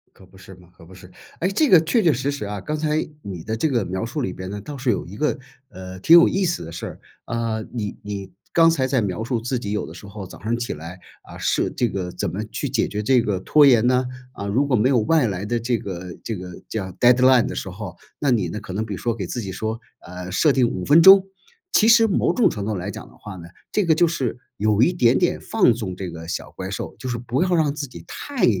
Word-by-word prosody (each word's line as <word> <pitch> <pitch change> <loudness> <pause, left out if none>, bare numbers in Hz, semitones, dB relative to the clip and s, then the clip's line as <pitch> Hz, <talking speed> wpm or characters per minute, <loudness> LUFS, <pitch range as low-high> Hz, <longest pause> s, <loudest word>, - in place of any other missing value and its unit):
可 95 - -17
不 95 +1 -19
是 95 - -13
吗， 90 -1 -19
可 85 - -15
不 95 - -15
是。 90 0 -14 0.3
诶？ 185 - +1
这 290 +9 +2
个 180 -6 +8
确 210 +8 +1
确 165 - +5
实 135 +3 -1
实 140 -7 -5
啊。 105 0 -4
刚 150 - -3
才 155 0 0 0.2
你 90 - -7
的 110 - -3
这 155 +8 0
个 120 -7 0
描 95 +5 -3
述 120 +6 -4
里 95 -8 -2
边 95 0 -7
呢， 105 - -5
倒 145 +5 -8
是 130 -1 -2
有 105 - 0
一 95 - -10
个， 150 +6 0 0.3
呃， 95 -1 -9
挺 165 - +7
有 170 - +7
意 195 0 0
思 170 - -1
的 80 - -9
事 85 - -6
儿。 - - -8 0.3
啊， 115 -1 -2
你 105 -4 -4
你 100 -2 -6 0.2
刚 165 -1 +6
才 135 -6 +1
在 130 -2 +1
描 100 +1 -2
述 120 0 -1
自 125 +3 -2
己 110 -4 -5
有 105 - -2
的 - - -10
时 - - -12
候 100 -1 -8
早 - - -13
上 115 +2 0
起 120 +1 -3
来， 85 +4 -9 0.2
啊， - - -12
是 - - 0
这 120 - 0
个 90 -2 -4
怎 100 -5 -3
么 105 +4 -4
去 115 +6 -4
解 125 -3 +1
决 105 - -3
这 125 +3 +3
个 105 -4 -1
拖 150 +10 +5
延 120 -4 +5
呢？ 125 0 +2 0.3
啊， 100 - -6
如 125 +8 +1
果 130 - +2
没 120 +3 +3
有 130 -4 +3
外 145 +3 +2
来 95 -1 -3
的 120 +3 -1
这 120 +1 0
个 90 -3 -7
这 110 - -3
个 90 -1 -9
叫 95 -4 -4
deadline 125 0 +5
的 - - -4
时 - - -4
候， 95 +1 -8 0.2
那 140 -3 +1
你 100 -8 +1
呢， 105 - -5
可 95 -4 -9
能 110 +3 -2
比 105 - -5
如 90 - -6
说 120 -2 -1
给 100 -5 -4
自 120 +7 -4
己 95 - -5
说， 110 +4 -4 0.2
呃， 90 +1 -8
设 150 - +3
定 130 -3 +3
5 90 - -4
分 155 +3 +6
钟。 190 +2 +9 0.5
其 220 - +5
实 230 0 +7
某 200 - +1
种 245 - +4
程 100 -2 -5
度 110 0 -2
来 95 +2 -4
讲 - - -9
的 - - -19
话 100 -3 -9
呢， 85 0 -10 0.2
这 210 -3 +1
个 160 - +4
就 175 - +4
是 135 -8 -2 0.2
有 105 +1 +2
一 170 - +5
点 125 -8 +3
点 175 - +1
放 210 - +3
纵 105 -6 -5
这 95 0 -5
个 80 0 -9
小 85 - -5
怪 - - -6
兽。 - - -6
就 130 - -6
是 120 -2 -2
不 120 +4 -2
要 180 -1 +1
让 150 -3 +2
自 145 -2 -5
己 125 - -12
太 280 -5 -1
115 Hz, 305 characters per minute, -22 LUFS, 95-140 Hz, 0.5 s, 钟